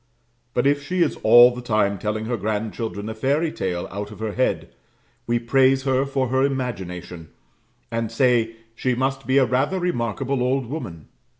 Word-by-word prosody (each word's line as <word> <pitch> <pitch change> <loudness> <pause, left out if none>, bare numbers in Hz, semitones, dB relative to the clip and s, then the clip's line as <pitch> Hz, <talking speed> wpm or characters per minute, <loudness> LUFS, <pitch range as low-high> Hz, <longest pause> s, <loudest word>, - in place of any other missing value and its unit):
But 120 - +1
if 145 0 +3
she 180 +5 +1
is 160 - -2
all 120 +2 +7
the 125 - -7
time 105 -4 0
telling 110 +2 -2
her 120 +2 -1
grandchildren 110 -1 -3
a 110 - -4
fairy 145 +8 0
tale 90 -2 -3
out 100 +1 -5
of 105 - -11
her 110 -1 -3
head, 100 -8 -1 0.5
we 120 0 +2
praise 130 +2 +3
her 135 0 +1
for 135 -2 -1
her 130 +1 +1
imagination, 95 - -3 0.6
and 115 -1 -2
say, 115 -2 +2 0.2
she 125 +2 -1
must 135 +1 -2
be 130 +1 +3
a 135 - +5
rather 130 +10 0
remarkable 135 - -1
old 130 +1 +1
woman. 105 - -7
120 Hz, 175 wpm, -23 LUFS, 110-135 Hz, 0.6 s, all